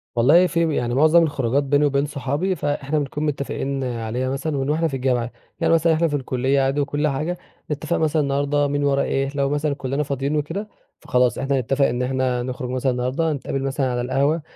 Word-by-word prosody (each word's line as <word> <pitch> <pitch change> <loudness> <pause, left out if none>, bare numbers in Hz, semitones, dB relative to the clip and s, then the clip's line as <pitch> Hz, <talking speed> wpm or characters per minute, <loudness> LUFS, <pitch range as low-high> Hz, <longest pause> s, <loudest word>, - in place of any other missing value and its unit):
والله 150 +10 +5
في 165 -2 0
يعني 120 0 -1
مُعظم 155 +4 +5
الخروجات 140 -3 0
بيني 145 +1 +2
وبين 140 0 +1
صحابي، 145 +6 -2
فإحنا 145 -1 -1
بنكون 145 +1 -3
متّفقين 140 -1 -2
عليها 120 +1 -2
مثلًا 140 +3 -2
من 135 +1 -1
وإحنا 160 +2 +1
في 150 - -7
الجامعة، 125 -2 0 0.3
يعني - - +2
مثلًا 165 0 +4
إحنا 165 +1 +2
في 145 - -2
الكُلّيّة 135 0 0
عادي 135 +2 +1
وكُلّ 145 +2 0
حاجة، 155 +5 -2 0.3
نتّفق 150 +3 -1
مثلًا 155 -1 +1
النهارده 145 +1 +1
مين 145 0 -1
وراه 140 -1 +2
إيه، 135 0 0
لو 140 -1 +1
مثلًا 145 0 0
كُلّنا 140 +2 -2
فاضيّين 140 +1 -2
وكده، 165 +8 -3 0.3
فخلاص 125 -1 +1
إحنا 135 0 0
نتّفق 135 +3 +1
إن 120 0 -1
إحنا 130 -1 0
نخرج 125 0 -5
مثلًا 130 +1 0
النهارده، 130 +6 -1
هنتقابل 135 -1 -3
مثلًا 135 -1 -1
على 120 0 -1
القهوة، 140 +6 +1
140 Hz, 200 wpm, -22 LUFS, 130-150 Hz, 0.3 s, والله